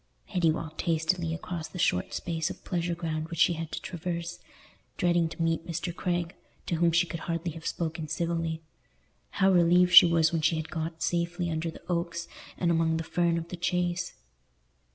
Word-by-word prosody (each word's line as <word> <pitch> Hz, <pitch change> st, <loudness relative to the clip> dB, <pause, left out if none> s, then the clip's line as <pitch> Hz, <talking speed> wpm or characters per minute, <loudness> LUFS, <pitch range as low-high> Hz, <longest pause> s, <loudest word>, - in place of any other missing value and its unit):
Hetty 180 Hz, -5 st, +1 dB
walked 160 Hz, 0 st, -3 dB
hastily 165 Hz, +1 st, 0 dB
across 165 Hz, 0 st, -4 dB
the -, -, -10 dB
short 90 Hz, -, +1 dB
space 165 Hz, -2 st, -2 dB
of -, -, -9 dB
pleasure 175 Hz, -1 st, -1 dB
ground 160 Hz, -1 st, -3 dB
which 170 Hz, -, -6 dB
she 175 Hz, -, +5 dB
had 165 Hz, -1 st, -5 dB
to -, -, -3 dB
traverse, 175 Hz, -1 st, -4 dB, 0.6 s
dreading 175 Hz, -2 st, +2 dB
to -, -, -11 dB
meet 165 Hz, 0 st, 0 dB
Mr. 170 Hz, +1 st, -3 dB
Craig, 175 Hz, -1 st, -1 dB, 0.3 s
to 170 Hz, -, -1 dB
whom 170 Hz, 0 st, +3 dB
she 175 Hz, +2 st, +4 dB
could 170 Hz, -1 st, -5 dB
hardly 170 Hz, +1 st, -1 dB
have 160 Hz, +1 st, -7 dB
spoken 160 Hz, -1 st, -3 dB
civilly. 165 Hz, 0 st, -2 dB, 0.7 s
How 195 Hz, -1 st, +3 dB
relieved 180 Hz, 0 st, +5 dB
she 180 Hz, -, +11 dB
was 165 Hz, -2 st, +3 dB
when 165 Hz, -2 st, 0 dB
she 155 Hz, +2 st, +3 dB
had 160 Hz, 0 st, -4 dB
got 160 Hz, -1 st, -4 dB
safely 175 Hz, 0 st, -1 dB
under 160 Hz, +1 st, -2 dB
the 160 Hz, -, -11 dB
oaks 170 Hz, -1 st, -2 dB, 0.3 s
and 170 Hz, -1 st, +1 dB
among 165 Hz, -1 st, +2 dB
the 165 Hz, -, -2 dB
fern 170 Hz, 0 st, +1 dB
of 165 Hz, 0 st, -5 dB
the 180 Hz, -, -6 dB
Chase! 180 Hz, +1 st, -1 dB
170 Hz, 190 wpm, -28 LUFS, 160-175 Hz, 0.7 s, she